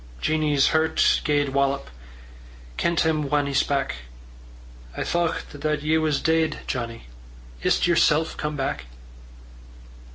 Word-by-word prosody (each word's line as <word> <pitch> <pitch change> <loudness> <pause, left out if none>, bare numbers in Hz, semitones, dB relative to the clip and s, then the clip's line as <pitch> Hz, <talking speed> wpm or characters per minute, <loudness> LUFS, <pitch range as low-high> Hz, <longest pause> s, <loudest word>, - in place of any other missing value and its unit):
Jeannie's 150 - +2
hert 160 0 +2
gaed 145 -1 +1
wallop, 140 - 0 0.8
Ken 170 - 0
't - - +2
him 155 -3 0
whan 145 0 +2
he 140 - -3
spak': 140 - 0 1.0
"I - - -1
thocht 170 -1 -1
that 150 -1 -1
ye 160 +1 +2
was 155 -3 +1
deid, 160 0 +1
Johnnie: 115 -3 -4 0.6
Is't - - +2
yersel' 165 -2 +2
come 150 0 -3
back?" 135 - -3
150 Hz, 125 wpm, -24 LUFS, 140-160 Hz, 1.0 s, Jeannie's